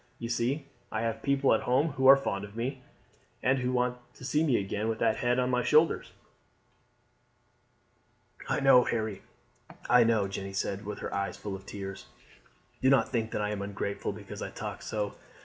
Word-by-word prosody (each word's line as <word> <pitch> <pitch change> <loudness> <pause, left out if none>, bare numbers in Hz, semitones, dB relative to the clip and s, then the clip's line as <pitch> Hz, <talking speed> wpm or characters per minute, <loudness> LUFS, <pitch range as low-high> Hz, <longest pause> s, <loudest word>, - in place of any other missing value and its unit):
You 115 - -5
see 125 +5 -1 0.3
I 110 - -1
have 115 -1 -2
people 140 0 +3
at 110 - +2
home 135 +6 +2
who 135 -2 +1
are 135 +1 +10
fond 100 -7 -3
of 100 +1 -9
me, 130 +3 -3 0.6
and 130 +1 +3
who 125 0 -1
want 125 0 0 0.2
to 125 - -10
see 150 +4 +2
me 140 -6 +3
back 100 - 0
again 105 +3 -2
with 110 - -1
that 110 - +2
head 120 0 +1
on 125 0 +1
my 125 0 +2
shoulders." 155 +2 +3 2.4
"I - - +1
know, 135 -2 +7
Harry; 110 -4 -2 0.7
I 125 -1 +6
know," 110 -3 +2
Jeanne 95 0 -6
said 100 +1 -2
with 105 - -4
her - - -4
eyes 100 0 -2
full 100 -2 -5
of 95 +1 -11
tears. 100 -1 -7 0.7
"Do 130 - +4
not 135 -2 +4
think 115 -3 -1
that - - -2
I 105 0 -1
am 105 -1 -3
ungrateful 100 0 -3
because - - -9
I - - -4
talk - - -6
so. 105 -2 -3
115 Hz, 195 wpm, -29 LUFS, 100-130 Hz, 2.4 s, are